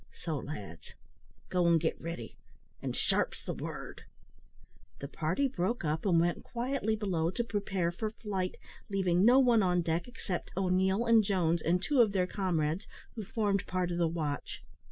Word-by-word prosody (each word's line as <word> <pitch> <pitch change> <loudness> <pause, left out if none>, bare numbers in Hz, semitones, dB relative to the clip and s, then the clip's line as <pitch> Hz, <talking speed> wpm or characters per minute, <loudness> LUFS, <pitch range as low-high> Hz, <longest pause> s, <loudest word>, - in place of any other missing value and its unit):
So, 160 -4 -3
lads, 100 - -8 0.5
go 180 -2 +2
and 170 -1 +5
git 160 0 -1
ready 165 -9 -6 0.5
an' - - -3
sharp's - - 0
the - - -2
word." - - -7 1.0
The 140 - -6
party 165 - 0
broke 230 -4 -1
up, 155 +5 -1
and 170 -3 +4
went 170 +1 +1
quietly 240 -2 -1
below 180 -6 0
to 235 +6 -1
prepare 195 -6 -1
for 215 +5 -3
flight, 200 -4 -3 0.3
leaving 185 -2 +2
no 245 +4 +7
one 245 -4 +5
on 180 -2 +2
deck 165 +4 -1
except 195 -7 -5
O'Neil 190 +3 +2
and 230 -2 +6
Jones, 175 -4 +1
and 175 +2 +2
two 270 +6 +3
of 215 -4 +3
their 185 -2 +2
comrades, 180 -2 -1 0.3
who 220 - -5
formed 205 -2 0
part 180 -1 -1
of 175 - -2
the 170 - +3
watch. 155 -4 -3
185 Hz, 170 wpm, -31 LUFS, 170-210 Hz, 1.0 s, no